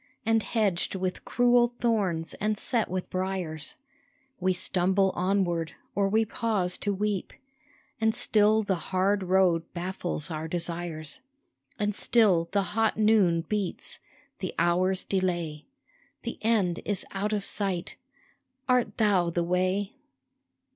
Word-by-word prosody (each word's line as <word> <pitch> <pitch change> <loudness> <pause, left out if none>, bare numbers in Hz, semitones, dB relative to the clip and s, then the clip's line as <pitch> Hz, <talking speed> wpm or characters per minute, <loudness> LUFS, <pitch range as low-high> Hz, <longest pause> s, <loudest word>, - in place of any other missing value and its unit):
And 225 0 +3
hedged 195 -4 0
with 185 -1 -3
cruel 245 0 +3
thorns 190 -9 0
and 210 +1 +1
set 230 0 0
with 185 0 -4
briars; 185 -5 -3 0.6
We 185 0 +2
stumble 190 +1 +1
onward, 175 -4 0 0.2
or 200 -1 +1
we 220 +2 +3
pause 200 -5 -1
to 205 - -1
weep, 200 0 -2 0.7
And 220 0 +3
still 215 0 +3
the 200 - 0 0.2
hard 195 +2 +2
road 185 -2 +3
baffles 175 -2 -3
our 155 0 -3
desires, 170 - -3 0.6
And 210 -1 0
still 195 -7 +3
the 200 0 +2
hot 225 0 +2
noon 210 -6 +4
beats, 200 +1 -4 0.4
the - - -4
hours 185 +2 +2
delay, 175 -5 -2 0.6
The - - -5
end 205 -6 +2
is 205 -2 -2
out 200 +2 -2
of 205 -2 -1
sight, 195 -4 -2 0.7
Art 250 -2 +2
Thou 195 -6 +3
the 170 0 0
way 185 +3 0
190 Hz, 125 wpm, -28 LUFS, 175-210 Hz, 0.7 s, noon